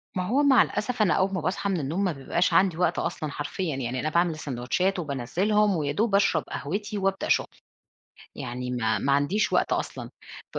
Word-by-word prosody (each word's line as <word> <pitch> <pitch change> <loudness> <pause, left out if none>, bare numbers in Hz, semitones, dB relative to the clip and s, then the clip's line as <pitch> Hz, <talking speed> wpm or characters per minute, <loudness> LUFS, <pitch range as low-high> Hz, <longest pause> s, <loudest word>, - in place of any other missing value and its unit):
ما 185 - 0
هو 275 +7 +2
مع 265 -5 +6
الأسف 220 +3 -1
أنا 200 -5 +4
أول 195 +1 +1
ما 185 - -1
باصحى 195 +4 -1
من 185 -4 0
النوم، 160 +8 -2
ما 185 - +1
بيبقاش 155 +5 -1
عندي 185 -4 +3
وقت 175 -1 +1
أصلًا 150 -2 -3
حرفيًا 150 +2 -3
يعني، 130 -1 -3
أنا 155 - -1
باعمل 170 +1 +2
الساندوتشات 155 +7 -1
وبانزّلهم 185 - +1
ويا 145 -3 -1
دوب 210 +5 +1
أشرب 195 -6 +3
قهوتي 205 +7 -4
وأبدأ 195 0 -1
شغل. - - +2 0.9
يعني 125 0 -5
ما 110 -3 0
ما 140 - 0
عنديش 145 +10 +1
وقت - - +2
أصلًا - - -3 0.4
ب - - -2
175 Hz, 195 wpm, -26 LUFS, 140-200 Hz, 0.9 s, مع